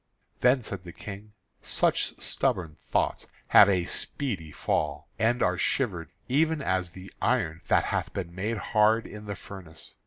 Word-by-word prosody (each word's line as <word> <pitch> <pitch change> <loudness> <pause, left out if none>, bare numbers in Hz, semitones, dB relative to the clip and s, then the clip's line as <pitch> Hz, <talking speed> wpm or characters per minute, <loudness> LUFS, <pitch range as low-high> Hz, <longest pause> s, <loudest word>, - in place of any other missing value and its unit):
Then 125 0 +4
said 100 -3 -6
the 85 -2 -10
King: 105 +1 -9 0.3
"Such - - +1
stubborn 80 -5 -1
thoughts - - 0 0.2
have 100 - +8
a 90 -3 +2
speedy 95 - -2
fall, 75 0 -1
and 120 +3 +2
are - - +1
shivered 90 - 0 0.2
even 160 +4 +2
as 95 -9 0
the 95 0 -11
iron 80 +1 +1
that - - +3
hath - - -1
been 90 -3 -5
made 105 +5 -2 0.2
hard 110 +1 +4
in 105 0 -9
the 100 -1 -4
furnace. 90 -4 -11
100 Hz, 155 wpm, -28 LUFS, 85-115 Hz, 0.3 s, have